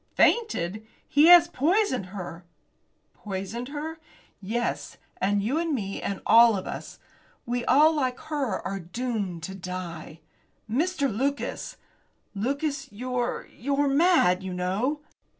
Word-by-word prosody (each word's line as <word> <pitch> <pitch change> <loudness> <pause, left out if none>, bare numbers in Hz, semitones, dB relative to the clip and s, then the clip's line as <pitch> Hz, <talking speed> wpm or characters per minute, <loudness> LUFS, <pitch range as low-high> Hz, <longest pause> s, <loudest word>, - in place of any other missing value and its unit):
"Fainted! 215 - +2 0.2
He 295 +3 +5
has 345 -1 +9
poisoned 330 - +1
her!" 180 -3 -7 0.7
"Poisoned 200 +4 -5
her!" 305 +3 -6 0.4
"Yes, 235 +5 -3 0.2
and 200 +1 +1
you 265 +9 0
and 330 -3 0
me 195 -5 -4
and 195 - -3
all 230 -2 +7
of 185 - -5
us! - - -7 0.5
We 240 0 -2
all, 305 +5 +5
like 260 -4 -1
her, 290 -9 -2
are 195 0 -3
doomed 195 -2 -4
to 190 - -5
die." 180 -4 -7 0.5
"Mr. 285 +6 0
Lucas!" 275 +5 -2 0.6
"Lucas, 280 +8 -2
you're 245 +3 -3
you're 280 +2 0
mad, 275 - +4
you 190 -1 -5
know." 205 +12 -1
240 Hz, 125 wpm, -26 LUFS, 195-290 Hz, 0.7 s, has